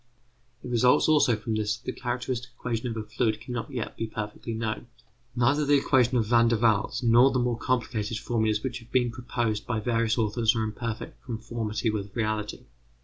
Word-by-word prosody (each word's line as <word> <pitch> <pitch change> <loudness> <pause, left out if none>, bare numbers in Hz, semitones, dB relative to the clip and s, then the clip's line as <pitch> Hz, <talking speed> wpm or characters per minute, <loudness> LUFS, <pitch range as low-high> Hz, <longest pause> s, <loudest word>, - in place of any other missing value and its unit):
It - - -6
results 125 +1 +4
also 150 -6 +4
from 110 +1 -4
this 110 +1 0
that 120 - -25
the - - -1
characteristic 125 0 -3
equation 120 0 -2
of 115 -1 -4
a 110 - -3
fluid 110 0 -1
cannot 120 0 -5
yet 125 -5 -4
be 115 - -2
considered 110 - -19
perfectly 115 +2 -7
known. 110 +1 -3 0.5
Neither 135 +5 +3
the 145 0 +4
equation 130 -2 +3
of 115 - +2
Van 115 +1 +4
der 115 -1 +2
Waals 110 +1 +1
nor 120 +3 +6
the 130 - 0
more 120 -1 +1
complicated 115 -3 -1
formulas 110 -2 0
which 125 -2 -3
have 115 0 -18
been 125 -2 +2
proposed 115 -3 -2
by 120 -3 0
various 115 0 +1
authors 115 +1 +2
are 110 - 0
in 110 - -2
perfect 115 +2 -6
conformity 115 -2 -2
with 100 -2 -5
reality. 110 -2 -2
115 Hz, 200 wpm, -27 LUFS, 110-125 Hz, 0.5 s, nor